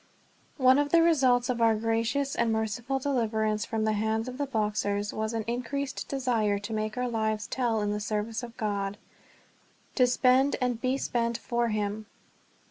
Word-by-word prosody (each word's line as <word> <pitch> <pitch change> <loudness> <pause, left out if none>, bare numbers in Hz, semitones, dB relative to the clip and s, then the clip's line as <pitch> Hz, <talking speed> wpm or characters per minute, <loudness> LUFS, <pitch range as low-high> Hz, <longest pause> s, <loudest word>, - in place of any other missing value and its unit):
ONE 260 0 +5
of 290 0 +1
the 335 +2 +5
results 260 -7 +3
of 245 -2 -1
our 225 -1 +5
gracious 230 +5 0
and 230 - +1
merciful 220 +4 -1
deliverance 220 -5 0
from 220 -1 -1
the 215 - +2
hands 220 +2 -1
of 255 +2 -7
the 285 - -1
Boxers 210 -3 -1
was 220 0 -2
an 225 -1 -2
increased 265 +4 -3
desire 235 -7 0
to 205 +2 -6
make 215 +1 -2
our 250 0 0
lives 220 -2 -1
tell 235 -4 0
in 205 0 0
the 210 - -2
service 210 +2 -2
of 235 -1 -9
God 200 -1 -2 1.0
to 250 -2 +4
spend 255 +2 +3
and 245 -3 -1
be 255 +1 +1
spent 235 -3 -1
for 240 0 -1
him. 215 0 -2
230 Hz, 175 wpm, -28 LUFS, 215-255 Hz, 1.0 s, ONE